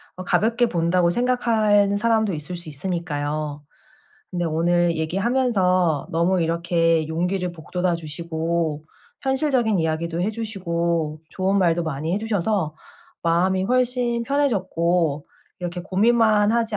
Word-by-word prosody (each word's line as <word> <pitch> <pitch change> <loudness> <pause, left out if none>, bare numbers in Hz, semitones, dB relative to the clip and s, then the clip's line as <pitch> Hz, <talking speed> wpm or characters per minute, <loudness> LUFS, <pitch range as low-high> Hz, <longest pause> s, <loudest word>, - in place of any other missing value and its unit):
어 185 - -7
가볍게 230 +5 +2
본다고 170 -1 +2
생각하는 215 -3 +2
사람도 220 -3 +1
있을 155 +4 -5
수 170 -2 -9
있으니까요. 150 -2 -3 0.7
근데 175 -1 -2
오늘 170 +1 +1
얘기하면서 185 - +1
너무 170 +2 +2
이렇게 165 -1 +1
용기를 180 +2 -1
북돋아 175 +2 -2
주시고 160 -1 -3 0.4
현실적인 265 - +1
이야기도 165 +1 -1
해 205 +4 0
주시고 170 -8 -2
좋은 195 +1 0
말도 170 -2 +2
많이 160 +2 -3
해 - - 0
주셔서 205 -6 -1 0.5
마음이 185 +3 +2
훨씬 245 -1 +1
편해졌고 180 - 0 0.3
'이렇게 175 0 -4
고민만 215 +2 +3
하지 225 -3 0
180 Hz, 300 characters per minute, -23 LUFS, 165-215 Hz, 0.7 s, 고민만